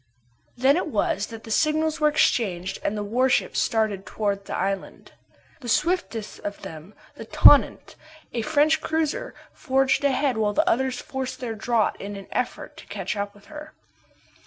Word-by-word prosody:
Then 270 +5 +4
it 360 - -1
was 205 -5 0
that 225 -1 -10
the 225 - -9
signals 310 +4 +1
were 305 - +4
exchanged 195 - +1
and 215 - -1
the 210 - -2
warships 250 +5 +1
started 215 -4 0
towards 200 -2 -3
the - - -3
island. 195 0 -4 0.5
The 245 - -7
swiftest 300 - -1
of 205 0 -7
them, 160 +5 -10 0.2
the - - -10
Tonnant, - - +5 0.4
a 235 - -1
French 305 +5 +2
cruiser, 315 -2 -2 0.2
forged 270 0 +1
ahead 270 -2 +1
while 210 -1 +1
the 310 - +1
others 255 +1 +1
forced 265 -1 -5
their 240 -3 -4
draught 220 0 0
in 200 +1 -6
an 195 -1 -9
effort 250 - -3
to - - -13
catch 195 -1 -4
up 205 0 -4
with 205 - -19
her. 305 0 -10
235 Hz, 165 wpm, -24 LUFS, 205-285 Hz, 0.5 s, Tonnant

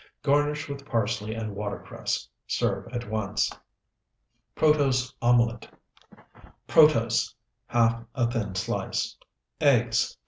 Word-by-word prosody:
Garnish 145 +1 +1
with 140 -1 -6
parsley 110 -3 -1
and 110 -2 -5
watercress. 100 0 -4 0.2
Serve - - -1
at 120 -2 -4
once. 105 -2 -1 1.0
PROTOSE 135 -5 +2
OMELET 120 -1 +2 1.0
Protose, 115 -8 +4 0.4
½ 115 0 +2
a 120 -2 +1
thin 105 -5 -3
slice. 95 - -2 0.4
Eggs, 120 -7 +3
2. - - -45
120 Hz, 100 wpm, -27 LUFS, 110-140 Hz, 1.0 s, Protose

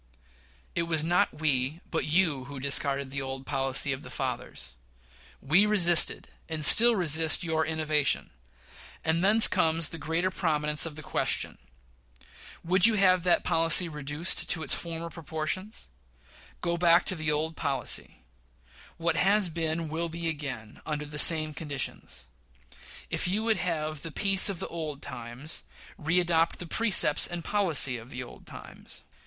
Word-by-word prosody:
It 170 -1 -2
was 160 -2 +1
not 175 -1 -1
we, 140 0 0
but 165 - -2
you, 155 -5 0
who 140 0 -9
discarded 140 0 -1
the 140 0 -4
old 135 0 -7
policy 135 0 +2
of 135 - -7
the - - -11
fathers. 120 - -6 0.7
We 175 +10 +3
resisted 175 -5 +2 0.2
and 155 -2 +1
still 235 +7 +9
resist 160 -2 +2
your 160 -1 -1
innovation; 155 -2 -1 0.7
and 160 +2 0
thence 215 +3 +7
comes 165 -4 +1
the 165 - -8
greater 165 +5 -2
prominence 150 -4 -1
of 155 - -9
the 155 - -9
question. - - -3 1.0
Would 185 +4 +5
you 225 - +1
have 185 -3 +3
that 180 - +2
question 165 +1 +3
reduced 150 +3 -2
to 160 -4 +1
its 140 - +2
former 170 0 -4
proportions? 165 +6 -6 0.7
Go 170 -1 -2
back 170 +1 +3
to - - -1
that 155 -2 -3
old 155 +2 -2
policy. 135 -3 -2 0.7
What 165 -1 -1
has 200 -1 +3
been 165 0 -3
will 165 +2 -3
be 165 +1 -4
again, 140 -9 -6
under 150 -1 -5
the 150 0 -6
same 155 -1 +4
conditions. 140 - -5 0.9
If - - -1
you 205 +4 -1
would 225 -2 +1
have 155 -4 -4
the 165 - -7
peace 195 +5 +4
of 195 - -4
the - - -6
old 155 -4 -7
times, 120 +6 -7 0.4
readopt 165 0 +1
the 175 - -8
precepts 185 -5 +3
and 175 -1 -6
policy 165 -11 +2
of 115 +2 -14
the 125 -1 -7
old 120 - -15
times. - - -12
160 Hz, 155 wpm, -27 LUFS, 150-175 Hz, 1.0 s, still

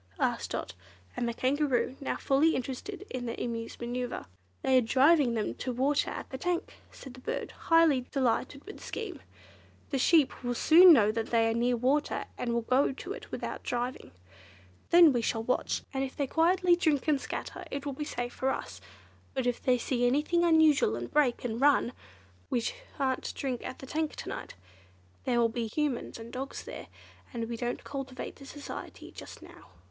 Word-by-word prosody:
asked - - 0
Dot - - -4 0.4
and 240 - -1
the - - -2
Kangaroo, 265 -1 +1
now 275 - -2
fully 285 +4 +3
interested 270 +11 -5
in 245 -1 -4
the 230 - -4
Emu's 230 -1 -4
manoeuvre. 245 +1 -4 0.4
"They 260 -1 +5
are - - +2
driving 265 +2 +4
them 215 -2 -1
to 255 - -4
water 270 +4 +1
at - - -6
the 265 - -5
tank," 355 +3 -2 0.2
said 265 - -11
the 255 - -12
bird, - - -4
highly 325 -7 +3
delighted 270 +1 0
with 415 - -9
the - - -15
scheme. 440 -5 -6 0.7
"The 270 - 0
sheep 300 -2 +3
will 245 0 -1
soon 345 +7 +8
know 215 -9 +6
that 225 0 -2
they 230 -1 +3
are - - 0
near 240 +1 +1
water, 270 +5 +1
and 240 - -2
will 235 0 0
go 255 +5 +3
to 360 +8 -6
it - - -10
without - - -5
driving. 245 +1 -3 0.8
Then 335 -4 +8
we 240 - +1
shall 225 0 -1
watch, 250 - -1
and 270 0 0
if 265 - -5
they 285 - +1
quietly 350 +5 +3
drink 315 -5 +1
and 290 -3 +2
scatter, - - -5
it 280 0 -5
will 285 - -2
be 300 - -4
safe 245 -4 -4
for 265 - -1
us, - - -4 0.5
but 260 -2 -1
if 245 -1 0
they 255 -1 +3
see 245 0 0
anything 300 +7 +2
unusual 315 - +4
and 120 +1 -6
break, 265 -5 +2
and 230 +1 -3
run—well, 275 -3 +4 0.6
we 240 - +1 0.4
shan't 265 -3 -1
drink 255 -3 -3
at - - -6
the - - -9
tank 310 +3 -2
to - - -6
night. - - -6 0.7
There 245 -2 +2
will 235 - +5
be 230 0 -3
Humans 285 +1 -2
and 230 0 -10
dogs 265 +2 -5
there, - - -8 0.4
and 230 -3 -3
we 235 - -4
don't 240 +1 -3
cultivate 270 -2 -6
their 275 - -12
society 290 0 -8
just - - -11
now." - - -14
260 Hz, 195 wpm, -30 LUFS, 240-295 Hz, 0.8 s, soon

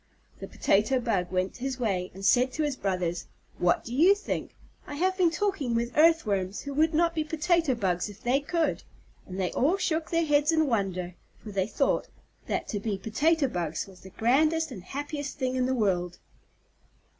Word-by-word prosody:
The - - -7
Potato 215 +6 +2
Bug 195 -8 -1
went 185 0 -1
his 260 +1 -4
way, 190 -6 -1
and 195 +1 -6
said 250 +4 +4
to 310 - -1
his 290 -3 -1
brothers, 180 -5 -2 0.3
"What 175 0 +2
do 235 - -6
you 345 +10 +6
think? 410 - -5 0.3
I 290 - -6
have 370 +5 +1
been 365 -3 +3
talking 330 - -1
with 235 +1 -1
Earthworms 215 - +3
who 280 - -6
would 315 +2 +2
not 335 +1 +3
be 315 -1 0
Potato 320 -2 +1
Bugs 185 -3 -1
if 205 - -12
they 250 +3 +2
could." 320 +3 -1 0.5
And 185 +1 -6
they 185 -2 0
all 310 +9 +2
shook 325 -4 -1
their 335 -1 +1
heads 295 0 +3
in 315 -1 +3
wonder, 190 -7 -1 0.3
for 215 - -8
they 195 -1 0
thought 270 +6 0 0.4
that - - -2
to 205 - -2
be 205 -1 -2
Potato 280 - +1
Bugs 170 -8 -3
was 190 -2 -15
the 190 - -11
grandest 305 - +2
and 195 - -7
happiest 285 - -5
thing 260 -2 -1
in 255 -1 +1
the 260 - 0
world. 180 -6 0
255 Hz, 190 wpm, -28 LUFS, 195-315 Hz, 0.5 s, you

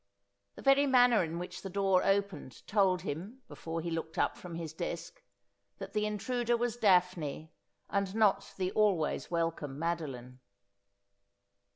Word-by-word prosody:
The - - -11
very 275 +1 +5
manner 245 -5 +5
in 165 0 -4
which 175 +1 -6
the 195 - -6
door 195 -1 +2
opened 195 -10 -1
told 190 -3 +2
him, 195 - -6
before 165 0 -5
he 170 +1 -4
looked 165 0 -4
up - - +1
from 175 -2 -9
his 165 -2 -5
desk, - - -5 0.6
that - - -8
the 210 0 +1
intruder 240 +3 0
was 240 -1 -1
Daphne, 180 -8 +1 0.4
and 200 0 -1
not 200 -3 +2
the 185 -1 -1
always 195 -7 +1
welcome 165 -5 -2
Madoline. 140 -7 -4
185 Hz, 145 wpm, -32 LUFS, 165-210 Hz, 0.6 s, very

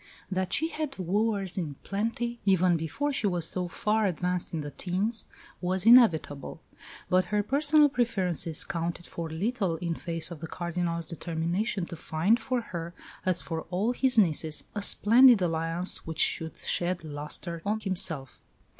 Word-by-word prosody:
That 185 -1 -1
she 320 - +1
had 305 -4 -4
wooers 195 +1 0
in 150 -5 -4
plenty, 230 +4 -2
even 185 -3 +3
before 170 - -2
she 225 -6 0
was 175 -3 0
so 180 -1 -2
far 210 +4 0
advanced 180 0 -1
in 160 - -3
the 145 0 -6
teens, 200 +8 -1 0.3
was 185 +2 0
inevitable; 210 - +4 0.5
but 185 0 +3
her 210 +3 0
personal 295 +5 +4
preferences 190 - +1
counted 175 -1 -4
for 165 -1 -6
little 190 +2 -1
in 170 +1 -3
face 165 0 -4
of 170 - -7
the 165 - -6
Cardinal's 170 -1 -3
determination 170 +4 -2
to 170 - -8
find 170 +8 +1
for 255 +1 -1
her, 170 -5 -7 0.3
as 185 -1 +1
for 165 -1 -4
all 195 +6 0
his 250 0 +1
nieces, 160 -5 +1
a 205 - -3
splendid 235 +3 +6
alliance 165 +1 0
which 160 -1 -6
should 160 0 +2
shed 175 0 -1
lustre 155 +3 -5
on 210 +2 -1
himself. 170 - -1
180 Hz, 155 wpm, -28 LUFS, 165-215 Hz, 0.5 s, splendid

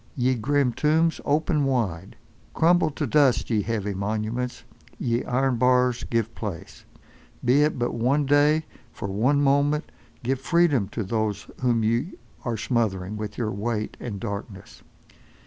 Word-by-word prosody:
Ye 130 0 +2
grim 130 +2 +1
tombs 160 +4 +2
ope 150 +4 +1
wide, 120 - 0 0.4
crumble 170 -1 +4
to 150 0 -3
dust 135 -2 +3
ye 110 -2 +2
heavy 105 -1 -2
monuments, 110 +5 -3 0.3
ye 120 0 -1
iron 130 0 +1
bars 125 0 +3
give 115 -1 -1
place! 100 -8 -7 0.6
Be 130 +4 +4
it 150 -1 +2
but 120 0 0
for - - -5
one 135 +5 +2
day, 145 +3 +3 0.3
for 105 - -6
one 130 +9 +2
moment, 145 +2 +2 0.3
give 130 +2 0
freedom 150 - +2
to 110 +2 -4
those 105 0 -2 0.2
whom 120 -3 +2
ye 115 - 0 0.3
are 120 -2 -2
smothering 105 -5 -1
with 105 -1 -6
your 110 -3 -1
weight, 110 +1 -3
and 105 -5 -5
darkness! 100 -2 -7
120 Hz, 145 wpm, -25 LUFS, 110-140 Hz, 0.6 s, crumble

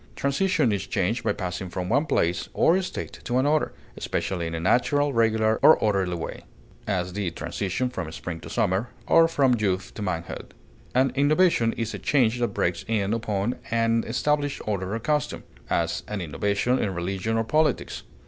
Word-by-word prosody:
Transition 140 - +1
is 100 -2 -2
change 105 +7 0
by - - +2
passing 90 -1 -4
from 90 0 -4
one 140 - +2
place 90 - 0
or 180 +3 +4
state 185 - -6
to 125 - -1
another, 145 +4 +2 0.2
especially 85 -3 -2
in 80 - -4
a - - -2
natural, 140 - +2
regular, 110 -1 +2
or - - +8
orderly 95 -4 +1
way; 85 - -6 0.4
as, 90 -3 -1
the 100 -2 -1
transition 100 +7 -2
from 95 -10 -5
spring 80 0 -6
to - - -10
summer, 95 +6 0 0.2
or 165 +6 +6
from 140 -6 +3
youth 95 -3 -1
to - - -7
manhood. 85 -4 -4 0.4
An 130 0 +3
innovation 145 -3 +3
is 115 -1 -3
a - - -5
change 125 -4 +2
that 120 - +2
breaks 85 -4 -1
in 105 -2 0
upon 110 0 -1
an 115 0 +2
established 145 +4 0
order 100 -1 -2
or - - -2
custom; 150 +4 -1 0.3
as, - - 0
an 105 - -3
innovation 100 - 0
in 95 -3 -1
religion 95 +5 -2
or 115 - +2
politics. 150 +4 0
110 Hz, 175 wpm, -25 LUFS, 95-130 Hz, 0.4 s, or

